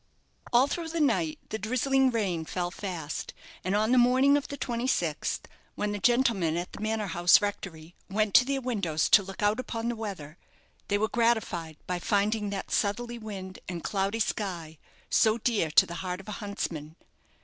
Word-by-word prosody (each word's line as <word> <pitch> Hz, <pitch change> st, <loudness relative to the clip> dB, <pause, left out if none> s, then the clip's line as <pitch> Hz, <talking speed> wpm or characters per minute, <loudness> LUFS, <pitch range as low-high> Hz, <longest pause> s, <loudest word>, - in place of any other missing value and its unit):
All 245 Hz, +2 st, +6 dB
through 330 Hz, +3 st, -3 dB
the 335 Hz, +1 st, -3 dB
night 310 Hz, +1 st, +1 dB
the 220 Hz, -, -3 dB
drizzling 260 Hz, +4 st, +2 dB
rain 195 Hz, -9 st, -1 dB
fell 175 Hz, +2 st, -3 dB
fast, 180 Hz, -6 st, -5 dB, 0.3 s
and 190 Hz, +2 st, 0 dB
on 215 Hz, +2 st, +2 dB
the 255 Hz, -, +6 dB
morning 260 Hz, +3 st, +5 dB
of 290 Hz, -, 0 dB
the 285 Hz, -, -6 dB
26th, 235 Hz, -, -1 dB, 0.3 s
when 210 Hz, 0 st, -1 dB
the 205 Hz, -, -3 dB
gentlemen 225 Hz, -8 st, +2 dB
at 175 Hz, +1 st, -4 dB
the -, -, -8 dB
manor 215 Hz, 0 st, -1 dB
house 175 Hz, -2 st, +5 dB
rectory 175 Hz, -5 st, -5 dB, 0.2 s
went 210 Hz, +1 st, 0 dB
to -, -, +8 dB
their 275 Hz, 0 st, -1 dB
windows 200 Hz, -11 st, 0 dB
to 210 Hz, -, +7 dB
look 195 Hz, +3 st, -7 dB
out 210 Hz, +3 st, +2 dB
upon 235 Hz, -2 st, -3 dB
the 240 Hz, -, -2 dB
weather, 190 Hz, -8 st, -7 dB, 0.5 s
they 205 Hz, -, +2 dB
were 215 Hz, +1 st, +1 dB
gratified 215 Hz, -10 st, 0 dB
by 180 Hz, -1 st, -2 dB
finding 205 Hz, +3 st, +1 dB
that 200 Hz, -1 st, -5 dB
southerly 235 Hz, +3 st, -1 dB
wind 195 Hz, -4 st, -7 dB
and 175 Hz, -2 st, -5 dB
cloudy 200 Hz, +2 st, -1 dB
sky 175 Hz, -8 st, -3 dB, 0.3 s
so 220 Hz, 0 st, +3 dB
dear 220 Hz, -8 st, 0 dB
to 150 Hz, -, +6 dB
the 170 Hz, -, -8 dB
heart 180 Hz, -1 st, -3 dB
of 195 Hz, -, -13 dB
a -, -, -5 dB
huntsman. 165 Hz, -7 st, -4 dB
205 Hz, 180 wpm, -28 LUFS, 180-235 Hz, 0.5 s, to